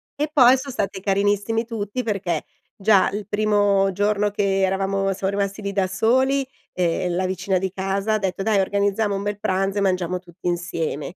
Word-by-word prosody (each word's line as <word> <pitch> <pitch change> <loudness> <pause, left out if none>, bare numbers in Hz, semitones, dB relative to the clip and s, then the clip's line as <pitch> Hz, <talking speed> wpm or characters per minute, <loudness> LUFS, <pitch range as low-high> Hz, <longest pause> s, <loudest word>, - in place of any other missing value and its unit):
e 295 +1 -1
poi 260 -3 +6
son 275 +1 -6
stati 195 -5 -3
carinissimi 205 +3 +1
tutti 225 +1 -4
perché, 195 -7 -2 0.3
già 200 -1 +3
il 205 -1 -5
primo 205 -2 +2
giorno 205 +1 +1
che 195 -1 0
eravamo 195 +1 0
siam 190 0 -2
rimasti 200 +1 -2
lì 200 0 -4
da 195 -2 +1
soli, 260 +7 +2 0.2
ehm, 175 0 -1
la 185 - 0
vicina 185 +1 -1
di 190 +1 -1
casa 195 +2 -1
ha 215 - +3
detto: 195 -2 -3
"Dai 200 -1 +2
organizziamo 200 +2 0
un 195 0 -3
bel 205 0 -2
pranzo 195 +1 -1
e - - 0
mangiamo 185 -2 0
tutti 180 0 -9
insieme". 170 -2 -3
200 Hz, 185 wpm, -22 LUFS, 190-210 Hz, 0.3 s, poi